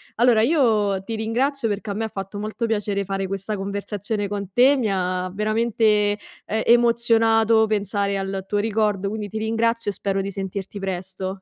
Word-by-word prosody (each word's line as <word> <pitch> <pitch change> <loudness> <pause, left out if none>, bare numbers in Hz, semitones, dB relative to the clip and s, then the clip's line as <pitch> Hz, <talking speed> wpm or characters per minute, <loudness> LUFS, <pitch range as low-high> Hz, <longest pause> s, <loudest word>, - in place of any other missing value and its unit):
Allora, 235 -1 +4
io 215 - +2
ti 225 +2 -4
ringrazio 240 +3 0
perché 205 0 -3
a - - -1
me 220 +2 -2
fatto 195 0 -6
molto 215 +2 -3
piacere 205 -2 -1
fare 195 0 -3
questa 195 +2 -4
conversazione 205 +1 -3
con 200 -2 -4
te, 265 +4 +5
mi 235 -5 0
ha 185 -1 -1
veramente, 220 +2 0 0.6
ehm, 220 +1 -1
emozionato 230 -1 +4
pensare 200 -1 0
al 195 0 -3
tuo 205 0 0
ricordo, 210 -2 0
quindi 210 -1 -4
ti 215 +2 -5
ringrazio 225 0 0
e - - -8
spero 195 +1 -1
di 200 +1 -4
sentirti 195 +1 -5
presto. 190 0 -5
210 Hz, 170 wpm, -23 LUFS, 195-225 Hz, 0.6 s, te